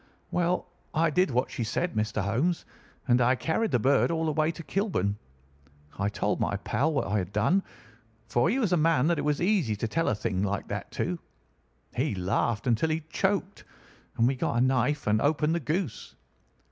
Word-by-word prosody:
"Well, 175 +1 +1 0.3
I 160 0 +3
did 180 +5 +3
what 125 +1 0
she 120 - -3
said, 140 +10 -1
Mr. 110 -1 -1
Holmes, 135 - 0 0.4
and 125 0 +4
I 125 +2 +4
carried 190 - 0
the - - +2
bird 135 +4 +3
all 165 -1 0
the 155 - +1
way 155 +1 +1
to 165 0 -6
Kilburn. 170 - 0 0.8
I 100 +1 +1
told 105 - -1
my - - 0
pal 155 +5 0
what 135 -5 0
I 105 +2 0
had 90 0 -4
done, 110 - +2 0.7
for 120 +1 +2
he 235 - +1
was 215 -9 +1
a - - +4
man 155 -4 +3
that 170 0 +2
it - - -2
was 150 0 +1
easy 180 - +2
to 110 +3 -2
tell 165 +9 0
a - - +2
thing 105 -3 -2
like 100 0 -2
that - - -4
to. - - -2 0.8
He 135 -2 0
laughed 95 +4 0
until 120 +6 +2
he 160 +1 0
choked, 195 0 -1 0.5
and 115 - +4
we 135 - +1
got 125 - -1
a - - +3
knife 130 +3 +1
and 105 +1 +2
opened 150 +2 +2
the 170 - +1
goose. 155 - -3
140 Hz, 200 wpm, -28 LUFS, 110-165 Hz, 0.8 s, and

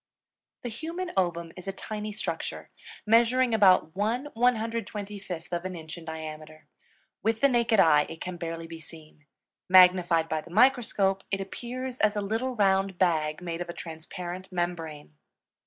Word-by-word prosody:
The 245 - -3
human 335 +9 -5
ovum 170 -3 0
is 180 +1 -11
a - - 0
tiny 210 +2 -5
structure, 190 -6 -4 0.3
measuring 235 +3 +4
about 185 -6 +5
1/125 220 - -2
of 170 0 -1
an 185 0 -5
inch 160 -1 -8
in 170 -2 -11
diameter. 155 -1 -8 0.6
With 225 +2 0
the 280 - +5
naked 235 -4 +2
eye 150 -4 +5
it 160 - -8
can 180 -1 -5
barely 165 0 -5
be 165 0 -9
seen; 155 -2 -14 0.4
magnified 180 -3 +6
by 155 -1 -1
the - - -15
microscope 210 -3 +3
it 195 - -1
appears 250 +6 -5
as 215 0 +3
a 205 - 0
little 225 +6 -2
round 195 -2 +2
bag 160 -2 +1
made 170 -1 -4
of 175 - -5
a - - -4
transparent 175 +3 -7
membrane. 165 - -4
185 Hz, 155 wpm, -28 LUFS, 165-220 Hz, 0.6 s, magnified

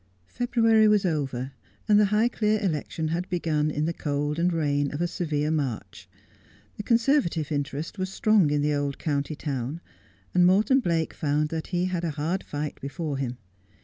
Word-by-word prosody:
February 225 - +3
was 210 -2 +3
over, 135 -6 -2 0.4
and 210 -1 +5
the 210 - +5
Highclere 215 0 +1
election 160 -2 -2
had 175 +3 -2
begun 160 -4 0
in 150 0 -1
the 170 - -1
cold 150 0 -2
and 175 +1 +2
rain 145 -4 0
of 145 - -5
a 175 - +1
severe 155 -3 -1
March. 105 - -3 0.7
The - - -3
Conservative 230 - +1
interest 145 +5 -3
was 185 0 -2
strong 215 -6 +3
in 145 0 +1
the 150 0 +1
old 145 -1 -1
county 145 0 -2
town, 140 +1 -4 0.5
and 180 - +4
Morton 205 +9 +4
Blake 165 -8 0
found 150 0 0
that 160 0 -4
he 180 0 0
had 180 -2 -2
a 170 - 0
hard 155 +5 -2
light 145 0 -4
before 140 +1 -4
him. 125 -2 -3
160 Hz, 175 wpm, -26 LUFS, 145-190 Hz, 0.7 s, and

